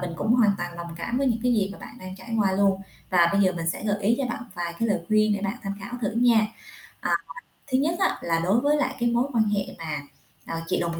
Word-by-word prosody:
mình 180 -1 -3
cũng 220 - +1
hoàn 230 -4 +5
toàn 175 0 -4
đồng 170 -1 -7
cảm 235 +9 -2
với 275 - +1
những, 230 -2 +1
cái, 250 -1 +3
gì 200 -3 +1
mà - - -11
bạn 245 - -11
đang 185 -1 -8
trải 225 +4 -5
qua 195 -3 +3
luôn, 195 0 +2 0.3
và 175 -2 +5
bây 200 - +3
giờ 185 -2 +4
mình 165 -1 -3
sẽ 210 - -6
gợi 205 -1 +1
ý 215 +4 +4
cho 275 - 0
bạn 240 -1 -4
vài 170 -1 -3
cái 230 - +1
lời 200 - +1
khuyên 215 0 +4
để 200 - -1
bạn 195 0 -2
tham 195 - -3
khảo 200 +5 -8
thử 205 - +1
nha. 230 -2 +4 0.6
Ờ, - - -1 0.6
thứ 255 - +4
nhất 305 +5 +1
á 385 - +2
là 165 -1 +1
đối 190 +7 +3
với 295 +2 +3
lại 295 - 0
cái 240 0 +2
mối 235 +1 +3
quan 225 -2 +4
hệ 200 -1 0
mà, 155 -3 -4 0.5
ờ, 165 0 -4
chị - - +1
đồng 170 -1 -2
200 Hz, 280 wpm, -25 LUFS, 175-235 Hz, 0.6 s, hoàn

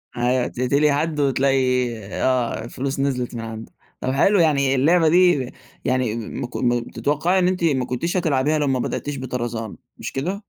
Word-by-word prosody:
أيوه، 125 +1 +1
تِقتلي 140 +4 +1
حدّ 150 +1 -1
وتلاقي 130 -2 +2 0.2
آه، 125 -3 0
فلوس 135 +2 -4
نزلِت 125 -3 -1
من 115 - -4
عنده. 110 0 -8 0.3
طَب 130 - -1
حلو 195 +8 +3
يعني 140 -4 +3
اللعبة 160 +5 +4
دي 175 -6 +4
ب - - -10 0.3
يعني 125 -3 0
ما 115 +2 -5
ك - - -15
م 120 -1 +1
تتوقعي 165 +6 0
إن 180 - +3
أنتِ 185 -2 -1
ما 135 -6 +2
كُنتيش 170 +10 -2
هَتِلّعبيها 155 -2 +1
لو 145 - 0
ما 130 -1 +1
بدأتيش 145 +3 -3
بطرازان 120 -4 -4 0.2
مش 120 - -6
كده؟ 185 +10 -3
135 Hz, 175 wpm, -22 LUFS, 125-150 Hz, 0.3 s, اللعبة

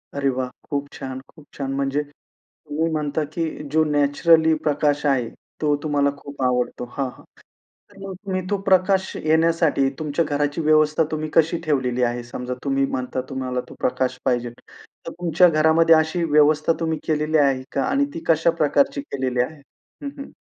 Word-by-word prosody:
अरे 140 -1 +1
वाह! 130 -1 -1 0.2
खूप 145 0 -2
छान! 130 0 -6
खूप 155 -3 -18
छान! 135 -1 -4
म्हणजे 140 +1 0 0.4
तुम्ही 155 +2 -4
म्हणता 150 0 -1
की 170 - -1 0.3
जो 160 0 +3
नॅचरली 160 +3 +4
प्रकाश 150 0 +1
आहे 130 -5 +1 0.3
तो 150 -1 +2
तुम्हाला 145 -2 +2
खूप 140 -1 -10
आवडतो. 125 -1 0
हां, 135 - 0
हां, - - -16 0.7
तर 200 - -18
मग 190 - -6
तुम्ही 185 -1 -1
तो 205 - +2
प्रकाश 190 0 +2
येण्यासाठी 160 -3 +2
तुमच्या 155 +1 -1
घराची 145 +1 -1
व्यवस्था 155 0 +3
तुम्ही 155 0 -3
कशी 165 +1 +3
ठेवलेली 130 -5 0
आहे? 120 0 0
समजा 125 +1 -5
तुम्ही 135 -1 +1
म्हणता 130 0 -3
तुम्हाला 130 -1 -2
तो - - -11
प्रकाश 130 0 -1
पाहिजेल, 120 -1 0 0.5
तर - - -5
तुमच्या 175 +1 +3
घरामध्ये 160 +1 +4
अशी 160 +2 +1
व्यवस्था 150 +1 +4
तुम्ही 160 -1 -1
केलेली 155 0 +1
आहे 135 -2 +2
का - - 0
आणि 270 +2 +2
ती - - -5
कशा 165 0 +4
प्रकारची 275 - +2
केलेली 130 - -2
आहे? 150 +4 -6 0.4
हं, 280 - -3
हं. 275 - -9
150 Hz, 165 wpm, -22 LUFS, 135-160 Hz, 0.7 s, नॅचरली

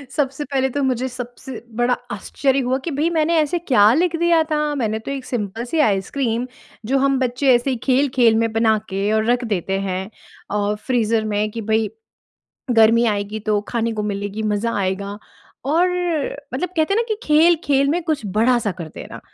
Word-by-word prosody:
सबसे 280 -1 -1
पहले 265 -1 0
तो 285 +2 -2
मुझे 260 -1 0
सबसे 250 0 -8
बड़ा 240 +1 +2 0.2
आश्चर्य 275 -1 0
हुआ 255 0 0
कि 335 - -2
भई, 300 +4 0
मैंने 330 0 +1
ऐसे 305 +3 +1
क्या 225 -9 +4
लिख 335 +3 +1
दिया 340 -1 +4
था? 300 -1 -1
मैंने 220 -5 -1
तो 225 - -6
एक 270 -2 -5
सिम्पल 225 -1 -3
सी 315 +6 -2
आइसक्रीम, 230 +5 -1 0.4
जो 265 +5 +1
हम 275 0 +2
बच्चे 255 +1 +2
ऐसे 240 +3 0
ही 260 - 0
खेल-खेल 255 -3 +3
में 225 - -1
बना 225 -1 +3
के 195 +2 -1
और 220 0 +1
रख 245 0 +1
देते 195 +1 -1
हैं 190 0 -3 0.4
अ, 205 0 0
फ़्रीज़र 225 -1 0
में 210 +1 0
कि 230 - -5
भई, 220 0 0 0.8
गर्मी 230 0 +5
आएगी, 205 0 -1
तो 210 -1 0
खाने 230 -1 -1
को 215 -1 -3
मिलेगी, 205 +2 -4
मज़ा 230 +3 -1
आएगा। 200 +1 -2 0.5
और 340 +4 +3 0.7
मतलब 320 +8 -1
कहते 320 +5 +2
हैं - - 0
ना - - +2
कि - - -11
खेल-खेल 300 -3 +3
में 340 +5 0
कुछ 310 -7 -2
बड़ा-सा 220 +2 +2
कर 170 -3 -8
देना, - - -9
245 Hz, 185 wpm, -20 LUFS, 215-280 Hz, 0.8 s, गर्मी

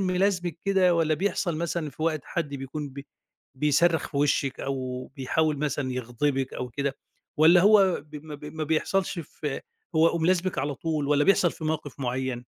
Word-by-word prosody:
ملازمِك 185 -2 0
كده، 190 -3 +4
والَّا 160 -2 +2
بيحصل 180 -2 -1
مثلًا 165 -1 -2
في 145 - -8
وقت 160 -2 +1
حد 170 -4 -2
بيكون 140 +2 -5
بي 140 +1 -10 0.5
بيصرّخ 150 +4 +2
في 140 - -7
وشِك 140 -2 +1
أو 130 -2 -3
بيحاول 150 +4 +1
مثلًا 140 -2 -1
يغضبِك 130 +2 -1
أو 125 - -4
كده؟ 140 +2 -3 0.4
والَّا 165 +3 +7
هو 195 -4 +5
ب 150 0 -9
ما 150 - -7
ب 145 +1 -11
ما 155 +1 -4
بيحصلش 175 +5 0
في 150 -3 -5 0.3
هو 165 +1 +4
ملازمِك 180 0 +1
على 140 +1 -1
طول 155 -2 -2
والَّا 145 0 +3
بيحصل 185 -3 +4
في 160 - -9
موقف 150 -3 -3
معيّن؟ 125 -1 -2
150 Hz, 170 wpm, -26 LUFS, 140-170 Hz, 0.5 s, والَّا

